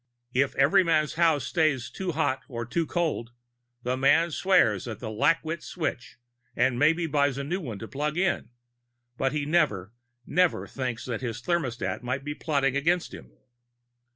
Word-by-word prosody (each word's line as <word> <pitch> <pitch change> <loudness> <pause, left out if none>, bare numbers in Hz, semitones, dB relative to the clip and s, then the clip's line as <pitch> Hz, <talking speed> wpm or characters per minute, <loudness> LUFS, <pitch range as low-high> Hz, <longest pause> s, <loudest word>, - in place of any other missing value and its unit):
If 135 +2 +1
Everyman's 155 +1 +3
house 160 -4 +3
stays 130 -3 +1
too 185 -3 -3
hot 145 -4 0
or 120 -3 -5
too 160 +8 -1
cold, 155 -9 -2 0.5
the 125 +1 0
man 150 +6 +3
swears 120 - +3
at 110 -3 -5
the 110 -3 -6
lackwit 165 +8 +1
switch 155 -11 -4 0.4
and 125 0 +2
maybe 165 +4 +3
buys 145 -3 +1
a 140 - -3
new 175 +7 -2
one 120 - -5
to 110 - -7
plug 150 +4 -3
in. 190 0 0 0.7
But 135 +1 0
he 150 -1 -2
never, 145 - +1 0.3
never 180 -1 +2
thinks 130 -2 -4
that 120 -2 -3
his 120 -2 -4
thermostat 125 - -2
might 130 +2 -3
be 150 +1 -4
plotting 140 -4 0
against 170 +5 +1
him. - - -11
140 Hz, 160 wpm, -27 LUFS, 125-165 Hz, 0.7 s, Everyman's